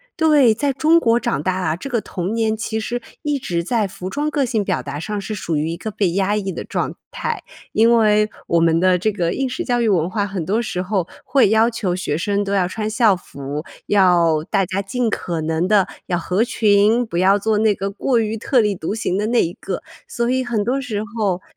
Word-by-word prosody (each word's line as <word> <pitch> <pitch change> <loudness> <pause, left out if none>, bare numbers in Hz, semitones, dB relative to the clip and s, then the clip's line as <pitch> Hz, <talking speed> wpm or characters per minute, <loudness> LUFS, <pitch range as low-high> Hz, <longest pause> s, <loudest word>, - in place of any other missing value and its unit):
对， 300 -8 +5
在 280 +4 0
中 320 +5 +4
国 235 -4 +3
长 235 - -1
大 185 -1 0
啊， 165 -4 -1
这 275 +10 -7
个 235 -3 +1
童 185 +1 -4
年 220 -1 +1
其 220 0 -3
实 240 +2 -3 0.2
一 295 -2 0
直 170 -9 -2
在 220 0 0
服 185 0 -7
装 295 +5 -1
个 285 -3 0
性 220 -3 0
表 - - -1
达 145 +1 -5
上 205 +5 -3
是 215 +2 -5
属 165 -5 -2
于 155 +2 -1
一 - - -3
个 220 - -5
被 200 -4 0
压 195 +3 +1
抑 195 -2 -2
的 - - -5
状 - - -3 0.2
态。 - - -3 0.3
因 230 +2 +4
为 210 -1 +3 0.2
我 170 - +2
们 165 0 +3
的 185 -1 +3
这 215 +3 +1
个 175 -4 -1
应 270 -1 -1
试 350 +7 -3
教 245 -1 +1
育 230 - +2
文 170 -4 +2
化 200 +2 -1
很 185 -5 -4
多 215 +5 +1
时 180 -5 -3
候 185 -2 -1 0.2
会 255 -5 +4
要 220 +1 +4
求 200 -6 -2
学 150 -5 -2
生 200 +4 0
都 200 0 -3
要 185 -3 +2
穿 215 +3 -4
校 220 -3 +3
服， 145 -3 -7 0.2
要 175 -6 +3
大 195 -2 +3
家 195 +1 -2
尽 235 +3 -1
可 170 -5 -3
能 160 +3 0
地 205 -2 +3 0.2
要 175 -1 -1
合 185 +6 +1
群， 215 +1 +3
不 170 - -4
要 195 +3 +4
做 215 +1 +1
那 215 -1 +3
个 195 0 -3
过 235 +4 0
于 220 0 -1
特 250 +3 +1
立 210 -3 +2
独 170 +4 -4
行 205 -4 -1
的 210 - 0
那 240 0 +3
一 170 - -3
个。 190 - -4 0.3
所 235 0 -1
以 260 0 0
很 225 -4 -1
多 255 +5 0
时 220 -6 -3 0.2
候 190 -4 0
205 Hz, 255 characters per minute, -20 LUFS, 180-230 Hz, 0.3 s, 对